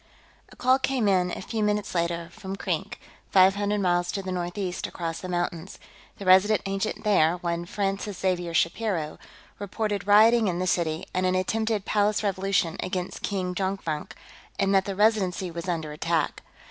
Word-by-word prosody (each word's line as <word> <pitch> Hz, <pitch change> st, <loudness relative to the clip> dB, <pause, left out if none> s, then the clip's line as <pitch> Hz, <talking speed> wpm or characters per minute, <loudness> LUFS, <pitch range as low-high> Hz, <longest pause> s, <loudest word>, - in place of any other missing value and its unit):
A -, -, -14 dB
call 255 Hz, +2 st, +3 dB
came 260 Hz, -4 st, 0 dB
in, 185 Hz, -2 st, +3 dB
a 180 Hz, -, -5 dB
few 225 Hz, +2 st, -3 dB
minutes 210 Hz, -1 st, 0 dB
later, 170 Hz, -1 st, -1 dB
from 190 Hz, +1 st, -7 dB
Krink, -, -, -3 dB, 0.3 s
five 190 Hz, 0 st, +6 dB
hundred 205 Hz, 0 st, -1 dB
miles 175 Hz, -1 st, +1 dB
to 195 Hz, -, -3 dB
the 185 Hz, -, -4 dB
northeast 180 Hz, +1 st, -3 dB
across 165 Hz, -2 st, -4 dB
the 185 Hz, -, -6 dB
mountains; 175 Hz, 0 st, -3 dB, 0.4 s
the 200 Hz, -, -8 dB
Resident 190 Hz, +3 st, +5 dB
Agent 195 Hz, +2 st, -2 dB
there, 180 Hz, -5 st, +3 dB
one 170 Hz, -1 st, -3 dB
Francis 195 Hz, 0 st, -2 dB
Xavier 175 Hz, -3 st, -1 dB
Shapiro, 170 Hz, -3 st, 0 dB, 0.4 s
reported 205 Hz, 0 st, -3 dB
rioting 220 Hz, +2 st, +6 dB
in 175 Hz, -2 st, -1 dB
the 185 Hz, -, -1 dB
city 165 Hz, -2 st, 0 dB
and 185 Hz, 0 st, +1 dB
an 185 Hz, -, +1 dB
attempted 220 Hz, +2 st, 0 dB
palace 210 Hz, 0 st, +1 dB
revolution 195 Hz, -4 st, 0 dB
against 185 Hz, -1 st, -4 dB
King 185 Hz, -3 st, -2 dB
Jonkvank, 190 Hz, -5 st, -3 dB, 0.4 s
and 195 Hz, 0 st, +1 dB
that 190 Hz, -1 st, +4 dB
the 195 Hz, -, -3 dB
Residency 195 Hz, -4 st, +1 dB
was 170 Hz, +2 st, -5 dB
under 160 Hz, -3 st, -2 dB
attack. 160 Hz, +1 st, -1 dB
190 Hz, 170 wpm, -26 LUFS, 175-205 Hz, 0.4 s, five